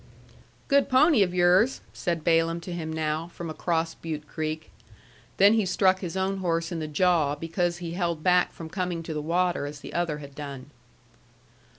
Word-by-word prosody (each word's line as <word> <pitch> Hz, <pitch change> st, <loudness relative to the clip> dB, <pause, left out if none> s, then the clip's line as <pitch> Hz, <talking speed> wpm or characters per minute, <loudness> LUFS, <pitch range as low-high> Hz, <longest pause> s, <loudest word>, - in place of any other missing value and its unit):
"Good 280 Hz, -1 st, +3 dB
pony 270 Hz, -1 st, +5 dB
of 185 Hz, -2 st, +3 dB
yours," 180 Hz, +7 st, +3 dB
said 170 Hz, -4 st, -2 dB
Balaam 165 Hz, 0 st, +2 dB
to 175 Hz, +1 st, -6 dB
him 160 Hz, -2 st, -4 dB
now, 160 Hz, +1 st, -2 dB
from 170 Hz, -1 st, -7 dB
across 165 Hz, 0 st, -1 dB
Butte 155 Hz, -2 st, -6 dB
Creek. 155 Hz, -5 st, -4 dB, 0.7 s
Then 200 Hz, +2 st, +7 dB
he 225 Hz, -1 st, +3 dB
struck 190 Hz, 0 st, +2 dB
his 180 Hz, 0 st, -5 dB
own 190 Hz, +1 st, 0 dB
horse 170 Hz, -2 st, -1 dB
in 170 Hz, -, -3 dB
the 155 Hz, -, -3 dB
jaw 155 Hz, -2 st, +2 dB
because 170 Hz, +3 st, -1 dB
he 175 Hz, -1 st, -6 dB
held 170 Hz, -3 st, -2 dB
back 180 Hz, -1 st, +3 dB
from 165 Hz, -, -9 dB
coming 180 Hz, -1 st, -3 dB
to 160 Hz, -, -5 dB
the 150 Hz, -, -3 dB
water 175 Hz, -1 st, 0 dB
as 145 Hz, 0 st, -8 dB
the -, -, -9 dB
other 170 Hz, -3 st, -1 dB
had 140 Hz, -2 st, -10 dB
done. 140 Hz, -1 st, -8 dB
170 Hz, 185 wpm, -26 LUFS, 155-180 Hz, 0.7 s, Then